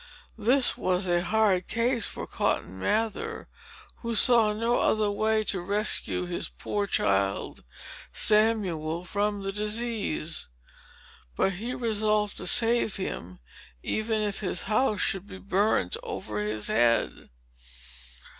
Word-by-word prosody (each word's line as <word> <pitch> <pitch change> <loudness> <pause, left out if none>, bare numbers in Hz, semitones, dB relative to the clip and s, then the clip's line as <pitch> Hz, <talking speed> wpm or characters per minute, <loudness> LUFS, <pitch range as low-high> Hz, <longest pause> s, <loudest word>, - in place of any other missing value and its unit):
This 250 +5 +3
was 185 +1 0
a 175 0 +2
hard 190 -1 +2
case 235 +1 +1
for - - -5
Cotton 95 +2 -2
Mather, 225 - -1 0.5
who 235 -1 -4
saw 230 -1 +5
no 230 +3 0
other 215 -1 +2
way 215 +1 +1
to 195 -3 -1
rescue 200 -1 0
his 175 -1 -4
poor 205 -1 -3
child 100 - 0 0.5
Samuel 185 -7 +2
from 205 +1 -1
the 195 - -2
disease. 210 -5 -2 0.9
But 195 - +2
he 230 +7 -5
resolved 215 -2 0
to - - -5
save 230 -2 +3
him, 90 - -6 0.4
even 215 0 -1
if 205 -1 -2
his 185 -4 -2
house 215 -1 +1
should 195 +1 -1
be 190 - -9
burnt 195 - +1
over 105 -1 -5
his 105 0 -2
head. 115 0 +1
210 Hz, 125 wpm, -27 LUFS, 180-220 Hz, 0.9 s, saw